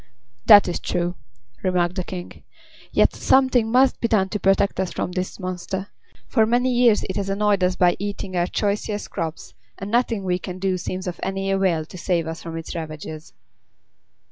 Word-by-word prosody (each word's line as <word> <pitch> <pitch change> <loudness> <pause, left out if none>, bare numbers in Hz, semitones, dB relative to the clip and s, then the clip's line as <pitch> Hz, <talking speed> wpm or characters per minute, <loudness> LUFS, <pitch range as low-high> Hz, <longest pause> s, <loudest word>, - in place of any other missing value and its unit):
"That 205 -2 +9
is 175 - -2
true," 175 0 -1 0.5
remarked 180 -2 +1
the 185 - -3
King. 180 0 -8 0.5
"Yet - - +3
something 260 -4 +3
must 260 +2 +3
be 230 - +2
done 195 -4 +2
to 210 - -3
protect 195 0 +2
us 190 -2 -1
from - - -3
this 185 +2 -4
monster. 185 +1 -4 0.4
For 220 -3 +3
many 245 +2 +2
years 240 -3 +4
it 190 - -4
has 195 -1 -2
annoyed 200 -1 +1
us 180 0 +2
by 175 -1 +3
eating 200 -1 -4
our 175 0 +1
choicest 205 +1 -2
crops, 165 -3 -5 0.2
and 195 +1 -6
nothing 230 -3 +1
we 180 -1 0
can 180 0 -6
do 185 -1 -1
seems 185 +2 -4
of 180 -2 -5
any 195 0 -2
avail 185 -5 +1
to 185 - -11
save 170 -2 0
us 165 +1 -6
from 165 -1 -6
its 165 - -6
ravages." 155 -1 -7
190 Hz, 185 wpm, -23 LUFS, 175-205 Hz, 0.5 s, That